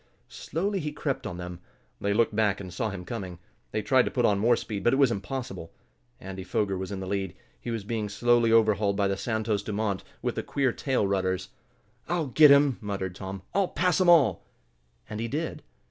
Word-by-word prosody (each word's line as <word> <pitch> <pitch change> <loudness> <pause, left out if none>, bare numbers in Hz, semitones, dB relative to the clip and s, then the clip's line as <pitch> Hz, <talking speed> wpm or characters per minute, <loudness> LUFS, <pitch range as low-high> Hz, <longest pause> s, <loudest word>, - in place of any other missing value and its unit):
Slowly 195 +5 -2
he 150 -3 -3
crept 135 -3 -3
on 90 - -6
them. 90 0 -7 0.4
They 100 - 0
looked 105 0 +2
back 105 -3 +2
and 95 -3 -8
saw 110 +4 -1
him 95 -3 -7
coming. 95 -4 -5 0.3
They 110 - -2
tried 130 +5 +4
to - - -1
put 125 -2 +1
on 100 -2 +3
more 120 +3 +4
speed, 105 -4 -5
but 120 - +3
it - - +4
was 135 -3 +4
impossible. 100 -4 -5 0.5
Andy 95 0 -7
Foger 95 +2 -1
was 95 +1 -5
in 100 - -4
the - - -4
lead. 95 -2 -3 0.2
He - - -7
was 115 -3 -3
being 110 0 -3
slowly 120 +2 +3
overhauled 105 -3 +3
by 100 -1 +2
the 100 - 0
Santos 110 -1 -1
Dumont, 105 -1 -2 0.2
with - - 0
the - - -2
queer 135 -3 0
tail 130 -3 0
rudders. 95 -1 -1 0.6
"I'll 170 -2 0
get 150 +3 +6
him!" 140 -2 +5
muttered 95 -3 -3
Tom. 95 0 -7
"I'll 195 -2 +2
pass 180 -1 +1
'em 180 - +4
all!" 140 - +5 0.6
And 110 - -6
he 115 - -2
did. 155 +6 -3
110 Hz, 205 wpm, -27 LUFS, 95-130 Hz, 0.6 s, get